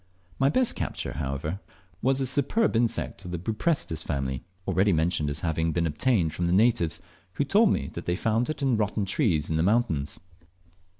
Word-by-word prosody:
My 135 - +4
best 250 - +3
capture, - - -4
however, 75 +5 -3 0.4
was 135 +1 +2
the 135 - 0
superb 145 - +1
insect 115 -3 0
of 90 - -7
the 90 - -3
Buprestis 110 - -1
family, 65 -4 -3 0.2
already 100 +2 +3
mentioned 80 -2 +1
as 70 - +1
having 80 -1 0
been 85 +1 +1
obtained 80 - +1
from 85 - -1
the 85 - +1
natives, 95 -6 +3 0.3
who 145 - 0
told 210 +8 +4
me - - 0
they 85 +1 -3
found 115 +5 0
it 155 -2 -3
in 130 -4 +2
rotten 105 -1 0
trees 90 - +1
in 80 - -1
the - - +2
mountains. 90 -7 +1
95 Hz, 180 wpm, -27 LUFS, 80-120 Hz, 0.4 s, My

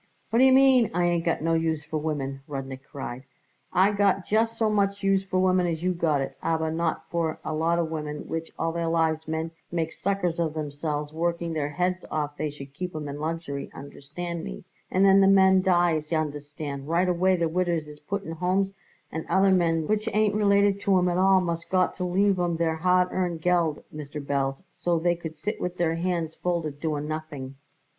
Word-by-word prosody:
"What 230 - +3
d'ye 265 +1 +7
mean, 260 -3 +6
I 175 0 +2
ain't 175 -1 +1
got 165 -2 0
no 165 0 +2
use 160 -2 0
for 155 +1 -3
women?" 140 -3 -3
Rudnik 135 -2 -6
cried. 130 -2 -7 0.5
"I 190 +3 +4
got 200 -2 +2
just 225 +2 +1
so 225 - +2
much 200 -1 +1
use 195 0 +3
for 190 -1 -2
women 185 -1 +3
as 165 -1 -3
you 185 0 +2
got 160 -5 +1
it, 135 - -4
aber 160 -1 0
not 165 0 -2
for 165 -2 -1
a - - -2
lot 165 +2 +1
of 165 -2 -1
women 150 -2 -5
which 165 0 -4
all 165 0 0
their 170 0 -2
lives 160 -1 +1
men 160 +1 -2 0.2
make 165 -1 -1
suckers 185 -3 -1
of 160 -2 -1
themselves 150 0 -3
working 170 0 -1
their 150 -2 -1
heads 180 +4 -1
off 150 -1 -2
they 155 0 -2
should 140 -1 -10
keep 180 +2 -5
'em 150 -1 -4
in 145 +1 -6
luxury, 155 -3 -4
understand 155 +5 -6
me, - - -7 0.3
and 190 +1 +3
then 195 0 +7
the 195 - +6
men 190 -1 +6
dies, 175 -4 +2
y'understand, 145 -2 -3
right 175 +3 +2
away 185 +1 +3
the 170 -2 +1
widders 170 -2 0
is 150 0 -11
put 200 +4 -4
in 165 - -6
homes 185 +4 0 0.4
and 160 - -4
other 190 0 +4
men 165 -3 +2
which 215 +4 0
ain't 215 -1 +3
related 200 -1 +3
to 200 -1 +3
'em 180 0 +2
at 175 +1 0
all 190 0 +5
must 170 -1 -3
got 185 -1 +2
to 180 - -5
leave 190 +2 +2
'em 175 -2 0
their 160 -1 0
hard 180 +2 +3
earned 175 -3 -1
Geld, 170 -4 +1
Mr. 150 0 -6
Belz, 140 +1 -2
so 175 -1 0
they 175 +1 +2
could 160 -2 -7
sit 210 +1 -4
with 180 0 -3
their 165 -2 +1
hands 165 -1 -1
folded 165 -5 -2
doing 150 -1 -2
nothing." 155 -4 -5
170 Hz, 210 wpm, -26 LUFS, 155-185 Hz, 0.5 s, d'ye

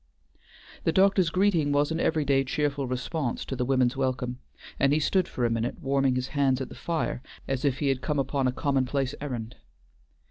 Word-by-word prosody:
The - - +2
doctor's 190 -1 +4
greeting 175 -5 +2
was 145 +2 +2
an 160 - -1
every 155 -3 +1
day 135 -1 +3
cheerful 140 0 -1
response 125 +1 -2
to 135 - -4
the 125 - -1
women's 130 -1 +2
welcome, 130 -2 -2 0.4
and 140 +1 +4
he 155 - +3
stood 185 +4 +2
for 125 - -2
a - - +2
minute 115 +1 -2
warming 135 -1 +1
his 125 0 -2
hands 135 -3 +2
at 130 - -4
the - - -9
fire 165 -6 -2 0.3
as 135 -1 -2
if 140 -3 +1
he 145 -1 0
had 130 -1 0
come 150 +1 -1
upon 135 0 0
a - - +2
commonplace 135 0 0
errand. 125 -5 -5
135 Hz, 200 wpm, -27 LUFS, 130-150 Hz, 0.4 s, doctor's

